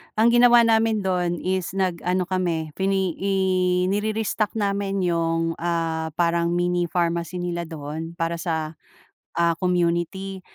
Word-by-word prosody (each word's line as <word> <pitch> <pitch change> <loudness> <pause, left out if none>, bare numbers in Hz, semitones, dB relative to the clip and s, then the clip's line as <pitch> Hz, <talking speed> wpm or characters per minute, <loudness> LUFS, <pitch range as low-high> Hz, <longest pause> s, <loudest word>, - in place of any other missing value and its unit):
Ang 225 +2 +4
ginawa 240 0 +6
namin 225 -2 +2
do'n 180 -2 -1
is 185 0 -2
nag-ano 185 -1 0
kami, 175 -4 -2
fi 190 +6 -2
ne 190 -2 +1
i 195 +1 0 0.6
nire-restock 215 +1 -1
namin 200 -2 -1
'yung 165 -1 0
ah, 165 -1 -1
parang 170 0 +1
mini 175 0 +1
pharmacy 170 0 -1
nila 175 -1 -3
doon 160 +1 -6
para 165 0 -2
sa 160 -2 -3 0.6
ah, 170 0 +3
community. 180 +2 -1
175 Hz, 130 wpm, -23 LUFS, 170-195 Hz, 0.6 s, ginawa